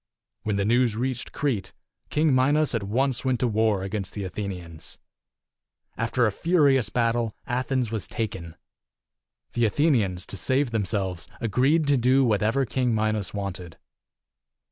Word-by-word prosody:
When 110 -2 -1
the 100 0 0
news 120 0 +3
reached 125 +1 -3
Crete, 130 -9 -2 0.4
King 150 -1 +2
Minos 145 +4 +3
at 115 - 0
once 125 +6 0
went 130 -2 +1
to 125 - +3
war 110 -3 +1
against 95 0 -4
the 100 - -3
Athenians. 90 -4 -6 1.0
After 120 +1 +1
a 110 - +2
furious 140 - +3
battle, 115 -2 0
Athens 130 -2 -1
was 110 -3 -3
taken. 95 -7 -4 1.0
The 120 -1 +2
Athe 145 +9 +2
nians, 95 -9 0
to 100 - -6
save 130 +8 +1
themselves, 95 -5 -1
agreed 130 +8 +2
to 145 -1 +3
do 130 +2 +4
what 105 -4 +2
ever 120 +6 +2
King 125 -1 0
Minos 110 -2 -1
wanted. 90 -4 -5
115 Hz, 145 wpm, -25 LUFS, 100-130 Hz, 1.0 s, do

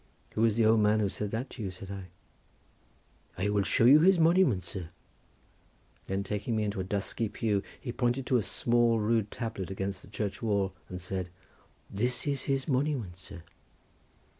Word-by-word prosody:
"Who 110 - -2
was 115 -2 +3
the 115 -1 +3
old 110 0 +5
man 105 +1 +3
who 105 -2 +1
said 105 +1 -3
that 115 +5 -4
to 120 - -8
you?" 100 - -2
said 95 +1 -9
I. 100 -2 -6 1.3
"I 95 +3 0
will 105 0 +2
show 105 +3 +2
you 140 +5 +9
his 185 +3 +5
monument, 165 - +4
sir," 85 -1 -6 1.2
then 95 +1 -1
taking 105 +3 -2
me 110 - +1
into 100 -2 -2
a - - -1
dusky 100 +3 -1
pew 105 -2 0 0.2
he 120 - -5
pointed 125 +1 0
to 130 -2 +3
a - - +2
small 120 +1 +2
rude 110 0 +1
tablet 110 -6 -5
against 95 0 -4
the - - -14
church 105 -1 -4
wall 100 -4 0 0.2
and 90 - -6
said:—"That 95 +2 -8 0.2
is 140 -2 0
his 135 -1 0
monument, 130 - 0
sir." 95 -1 -11
105 Hz, 180 wpm, -30 LUFS, 95-120 Hz, 1.3 s, you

